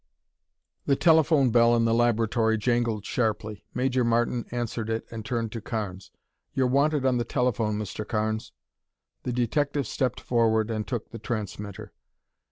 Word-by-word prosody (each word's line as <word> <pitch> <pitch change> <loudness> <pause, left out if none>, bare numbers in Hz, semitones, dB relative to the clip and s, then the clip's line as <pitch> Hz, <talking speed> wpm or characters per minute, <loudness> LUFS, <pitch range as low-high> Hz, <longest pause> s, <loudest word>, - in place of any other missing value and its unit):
The 140 - +4
telephone 155 -5 +4
bell 120 0 +5
in 115 -1 +2
the 115 - +2
laboratory 115 -1 +2
jangled 115 -2 0
sharply. 110 -3 -2
Major 130 0 +1
Martin 120 +1 +1
answered 115 -2 -3
it 110 0 -2
and 115 -1 -6
turned 115 -1 -2
to 115 - -5
Carnes. 100 -5 -5 0.5
"You're 130 - +2
wanted 140 +2 +2
on 130 -2 +3
the - - +1
telephone, 120 -4 0
Mr. 105 0 -5
Carnes." 110 0 -2 0.7
The 125 - -3
detective 140 +4 0
stepped 125 +2 -1
forward 115 -2 +1
and 110 -1 -3
took 120 -4 -4
the 115 - -7
transmitter. 105 -4 -5
115 Hz, 150 wpm, -26 LUFS, 110-125 Hz, 0.7 s, bell